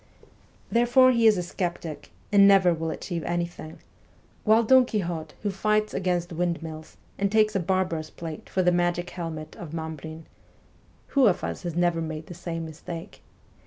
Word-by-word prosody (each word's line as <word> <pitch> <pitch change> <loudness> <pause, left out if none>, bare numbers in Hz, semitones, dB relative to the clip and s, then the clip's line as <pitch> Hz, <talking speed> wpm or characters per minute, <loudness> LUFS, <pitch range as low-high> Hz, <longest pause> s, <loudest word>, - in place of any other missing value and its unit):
' - - -32 0.3
Therefore 245 +2 +5
he 230 -2 +4
is 215 -3 +5
a 180 - -1
sceptic, 175 -3 -4 0.2
and 200 -1 +7
never 190 -3 +6
will 165 0 -3
achieve 170 +1 -4
any 175 0 0
thing; 160 -2 -10 0.7
while 220 +1 +5
Don 260 +3 +6
Quixote, 175 -9 -3
who 205 - 0
fights 215 +2 0
against 175 -2 -1
wind 170 0 -1
mills, 155 -1 -9 0.2
and 200 0 +1
takes 215 -1 +3
a - - +3
barber's 175 -3 -1
plate 160 -2 -8
for 185 - +1
the 180 - +4
magic 175 0 0
helmet 160 -3 -6
of 165 -2 -7
Mambrin 160 0 -6 0.9
(who 275 -4 +4
of 185 - +1
us - - -4
has 175 -4 -4
never 175 -1 +1
made 160 -1 -5
the 175 - -9
same 165 -1 -5
mistake?) 165 +1 -8
175 Hz, 175 wpm, -26 LUFS, 165-200 Hz, 0.9 s, and